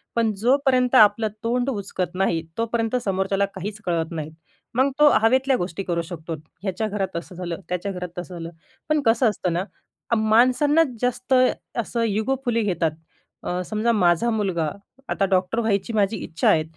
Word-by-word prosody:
पण 230 -2 +2
जोपर्यंत 255 +2 +2
आपलं 215 0 +6 0.2
तोंड 245 +3 0
उचकत 195 -5 -3
नाही, 180 -3 +1 0.2
तोपर्यंत 230 +1 -1
समोरच्याला 195 +1 +1
काहीच 205 +3 -5
कळत 165 -1 -1
नाहीत. 155 -1 -5 0.4
मग 265 +3 +3
तो 300 - +7
हवेतल्या 260 +3 +3
गोष्टी 180 +2 -4
करू 170 -2 -1
शकतो. 165 -1 -7 0.3
ह्याच्या 205 +2 -1
घरात 195 -3 -3
असं 175 +1 -8
झालं, 175 -1 -5
त्याच्या 180 +2 -2
घरात 180 -1 -5
तसं 180 0 -6
झालं. 165 0 -6 0.4
पण 305 -1 +2
कसं 225 +1 +4
असतं 180 -3 -2
ना, 175 +2 0 0.5
अ, - - +5
माणसांना 250 +8 +4 0.2
जास्त 250 +1 -1 0.5
असं 230 +2 -2
इगोफुली 230 +2 0
घेतात. 170 -6 0 0.5
अ, 180 +1 -2
समजा, 220 +3 0
माझा 180 +1 +3
मुलगा 185 -8 0 0.4
आता 195 - +1
डॉक्टर 185 +5 +1
व्हायची 220 0 0
माझी 205 0 +1
इच्छा 165 +1 0
आहे, 155 - +4
205 Hz, 160 wpm, -23 LUFS, 180-235 Hz, 0.5 s, तो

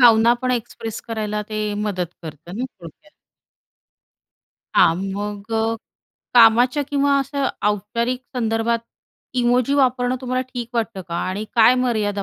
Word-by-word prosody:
भावना 230 -1 +7
पण 255 - +1
एक्सप्रेस 230 -2 -4
करायला 210 -2 -2
ते 215 - -3 0.2
मदत 205 -4 -2 0.2
करतं 165 +4 -9
ना 250 - -2 0.2
थोडक्यात. 170 - -13 1.6
हां, 165 - +6 0.2
मग 205 +1 -5
अ, 225 0 +1 0.6
कामाच्या 245 +4 +6
किंवा 280 0 +2
अशा 275 0 -1 0.2
औपचारिक 235 +5 -1 0.2
संदर्भात 225 0 +1 0.6
इमोजी 245 +3 +2
वापरणं 255 -2 +2
तुम्हाला 255 0 -1
ठीक 240 -2 -4
वाटतं 225 -4 -2
का 170 - -4
आणि 200 +3 -3
काय 230 +2 +6
मर्यादा 205 -4 0
225 Hz, 130 wpm, -21 LUFS, 210-250 Hz, 1.6 s, भावना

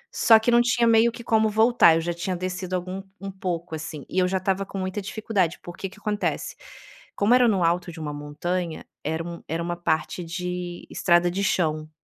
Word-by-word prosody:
Só 225 -1 +7
que 220 +2 +1
não 240 0 +6
tinha 240 -1 +2
meio 230 +1 +5
que 235 +1 -10
como 220 -1 +3
voltar, 220 -6 +5
eu 165 - +1
já 175 +1 -2
tinha 180 +2 -3
descido 185 +1 -3
algum 185 +1 -4 0.2
um 195 0 -6
pouco, 175 -3 -4
assim, 155 -2 -6
e 185 - -1
eu 180 - +3
já 190 +1 0
tava 195 +1 0
com 195 - -8
muita 185 +2 -3
dificuldade, 195 -4 -1
porque 175 +2 -6
o - - -11
que 200 - -17
acontece? 210 0 -2 0.6
Como 205 +4 +3
era 250 -1 +6
no 195 -5 +2
alto 175 +1 +1
de 165 - -10
uma 150 -1 -4
montanha, 160 +4 -4 0.2
era 160 +2 -2
um 170 0 -7
era 165 +2 -2
uma 175 0 -2
parte 170 +1 -1
de 180 0 -5
estrada 175 -1 +3
de 195 +2 -2
chão. 155 -5 0
180 Hz, 215 wpm, -25 LUFS, 170-200 Hz, 0.6 s, Só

